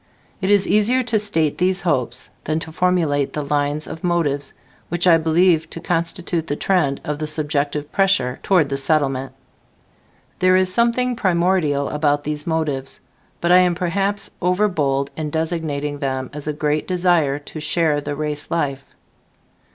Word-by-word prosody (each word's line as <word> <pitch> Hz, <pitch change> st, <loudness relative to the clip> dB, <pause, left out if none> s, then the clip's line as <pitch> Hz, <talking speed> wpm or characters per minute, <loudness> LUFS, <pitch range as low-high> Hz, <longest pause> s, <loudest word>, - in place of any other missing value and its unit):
It 190 Hz, -, 0 dB
is 205 Hz, -1 st, +4 dB
easier 235 Hz, +5 st, +3 dB
to 225 Hz, -2 st, +1 dB
state 165 Hz, -8 st, +1 dB
these 185 Hz, +1 st, +1 dB
hopes 130 Hz, -7 st, -1 dB, 0.2 s
than 155 Hz, +1 st, 0 dB
to 160 Hz, -, -7 dB
formulate 160 Hz, -5 st, +1 dB
the 150 Hz, -1 st, -3 dB
line 145 Hz, 0 st, 0 dB
of 160 Hz, -, -8 dB
motives, 150 Hz, -6 st, 0 dB, 0.4 s
which 175 Hz, +1 st, 0 dB
I 170 Hz, -2 st, +7 dB
believe 160 Hz, 0 st, +2 dB
to -, -, -4 dB
constitute 170 Hz, 0 st, -1 dB
the 145 Hz, -, -1 dB
trend 150 Hz, -6 st, +1 dB
of 150 Hz, 0 st, -3 dB
the 155 Hz, -, -3 dB
subjective 150 Hz, -1 st, -2 dB
pressure 160 Hz, -11 st, +1 dB
toward 180 Hz, -7 st, +2 dB
the 135 Hz, -, -1 dB
Settlement. 135 Hz, -2 st, 0 dB, 1.1 s
There 185 Hz, 0 st, +4 dB
is 185 Hz, 0 st, +3 dB
something 240 Hz, +2 st, +2 dB
primordial 170 Hz, -8 st, +1 dB
about 145 Hz, -1 st, 0 dB
these 150 Hz, +1 st, -4 dB
motives, 150 Hz, -5 st, -2 dB, 0.4 s
but 170 Hz, -, +1 dB
I 180 Hz, -, +8 dB
am 180 Hz, -1 st, +3 dB
perhaps 195 Hz, +3 st, -1 dB
overbold 165 Hz, -8 st, +1 dB
in 155 Hz, -1 st, -3 dB
designating 155 Hz, -3 st, -2 dB
them 130 Hz, -2 st, -3 dB
as 150 Hz, 0 st, -7 dB
a 150 Hz, -, -1 dB
great 150 Hz, 0 st, -1 dB
desire 175 Hz, -6 st, +2 dB
to 145 Hz, +2 st, -9 dB
share 150 Hz, -1 st, +1 dB
the 145 Hz, -, -4 dB
race 150 Hz, 0 st, -4 dB
life. 140 Hz, -5 st, -3 dB
160 Hz, 160 wpm, -20 LUFS, 145-180 Hz, 1.1 s, I